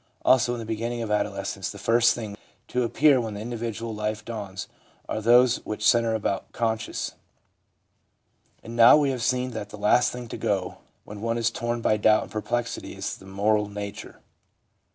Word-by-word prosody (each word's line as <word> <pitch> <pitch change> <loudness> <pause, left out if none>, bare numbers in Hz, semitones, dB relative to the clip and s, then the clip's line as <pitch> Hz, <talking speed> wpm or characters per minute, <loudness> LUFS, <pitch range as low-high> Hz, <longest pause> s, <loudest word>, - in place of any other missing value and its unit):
Also 120 -1 +4
in - - -6
the 115 - -6
beginning 115 +2 -3
of 110 - -4
adolescence 105 - -2
the - - -8
first 115 0 +3
things 110 -4 -6 0.3
to 125 - -1
appear 135 +3 +4
when 110 -3 -5
the - - -6
individual 115 0 -4
life 105 0 -3
dawns 100 -5 -6 0.4
are 110 - -3
those 120 +2 +5
things - - -17
which 105 0 -1
centre 115 -2 +3
about 100 -2 -2
conscience. 110 -1 -2 1.5
And 115 +1 -8
now 115 +4 +8
we 145 -2 +2
have 125 -2 -4
seen 125 +1 0
that 105 -3 -6
the - - -9
last 105 +4 +3
thing 125 -1 -7
to - - -5
go 95 -3 -2 0.2
when 105 0 -10
one 115 +1 -1
is 115 -1 +1
torn 120 0 -3
by 110 - +2
doubt 110 +1 +4
and - - -12
perplexity 115 +2 -3
is - - -4
the 95 - -15
moral 105 +2 +1
nature. 105 +1 -7
115 Hz, 185 wpm, -25 LUFS, 105-120 Hz, 1.5 s, now